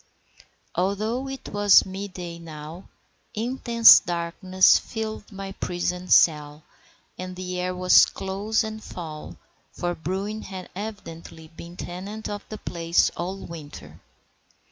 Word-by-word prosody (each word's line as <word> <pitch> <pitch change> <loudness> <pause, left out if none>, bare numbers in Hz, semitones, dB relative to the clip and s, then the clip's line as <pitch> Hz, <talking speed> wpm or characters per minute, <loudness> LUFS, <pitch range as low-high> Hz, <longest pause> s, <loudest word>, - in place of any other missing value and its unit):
Although 215 +8 -1
it 270 0 -7
was 205 0 +5
mid 195 0 -6
day 170 -2 -7
now, 160 +2 -10 0.5
intense 235 0 +6
darkness 180 +2 +3
filled 220 -1 -6
my 195 -1 -7
prison 180 -1 -3
cell, 150 -3 +3 0.6
and 185 0 -6
the 180 0 -4
air 180 0 -2
was 180 0 +6
close 200 +4 -1
and 220 0 -6
foul, 155 -4 -8 0.3
for 175 -1 -3
Bruin 195 +6 -4
had 190 -3 -8
evidently 165 -6 -8
been 170 +2 -12
tenant 200 +5 -6
of 205 0 -5
the 215 - -6
place 170 -3 +1
all 190 +3 -5
winter. 155 -4 -10
185 Hz, 120 wpm, -25 LUFS, 170-205 Hz, 0.6 s, intense